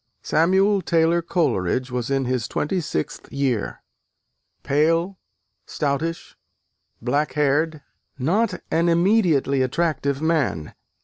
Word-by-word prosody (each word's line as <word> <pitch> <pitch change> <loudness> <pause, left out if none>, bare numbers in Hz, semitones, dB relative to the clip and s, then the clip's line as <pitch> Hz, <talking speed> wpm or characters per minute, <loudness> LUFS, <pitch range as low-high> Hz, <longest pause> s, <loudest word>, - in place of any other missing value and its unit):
Samuel 190 +5 +3
Taylor 170 0 +2
Coleridge 130 - 0
was 125 0 -3
in 135 -1 0
his 125 -3 -1
twenty 180 +5 -1
sixth 80 - -4
year: 130 -5 -2 0.8
pale, 165 +6 +1 0.5
stoutish, 155 +3 -3 0.7
black 145 +5 0
haired: 150 +1 +1 0.3
not 185 - 0
an 170 +1 +2
immediately 170 -7 +2
attractive 140 0 0
man. 145 - -1
155 Hz, 100 wpm, -22 LUFS, 135-170 Hz, 0.8 s, Samuel